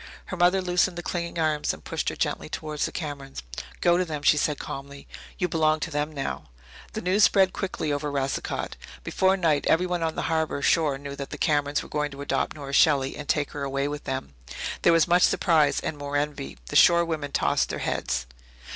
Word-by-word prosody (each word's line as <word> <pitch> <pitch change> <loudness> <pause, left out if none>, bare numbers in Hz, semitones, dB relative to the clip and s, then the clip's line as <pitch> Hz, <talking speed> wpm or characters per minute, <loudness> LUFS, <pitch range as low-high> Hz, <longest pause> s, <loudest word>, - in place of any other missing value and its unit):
Her - - -5
mother 180 +2 +3
loosened 180 0 +1
the 175 - -5
clinging 170 -1 -3
arms 155 -2 +1
and - - -18
pushed - - -2
her - - -6
gently - - -2
towards 155 -1 -3
the - - -7
Camerons. 140 - -6 0.4
"Go 175 0 +4
to 185 - +2
them," 155 -4 -5
she 150 - +6
said 150 0 0
calmly. 140 0 -8 0.3
"You 180 - 0
belong 155 -2 +2
to 170 - -3
them 150 +1 -1
now." 140 - -5 0.4
The - - -4
news 190 +4 +3
spread 190 -2 +5
quickly 160 -6 -2
over 145 +1 -2
Racicot. 140 -1 -2 0.3
Before 190 +1 +2
night 160 -6 +1
everyone 180 +1 +2
on 160 -1 -1
the - - -2
harbour 160 -3 -1
shore 150 -4 +3
knew 140 0 -7
that 140 - -5
the - - -6
Camerons 145 -2 +1
were - - -10
going 150 0 -1
to 140 0 -9
adopt 145 - -1
Nora 140 -2 -7
Shelley 140 -3 +4
and 150 -2 -8
take 145 0 +1
her 145 - -6
away 140 0 -1
with 145 0 -5
them. 130 - -4 0.5
There - - +5
was 165 -2 +4
much 175 +1 +4
surprise 160 -6 +3
and 150 - -4
more 145 0 -2
envy. 145 - -3
The - - -5
shore 170 0 +6
women 155 -4 -3
tossed 70 - +1
their - - -3
heads. 60 - -2
150 Hz, 210 wpm, -26 LUFS, 140-170 Hz, 0.5 s, she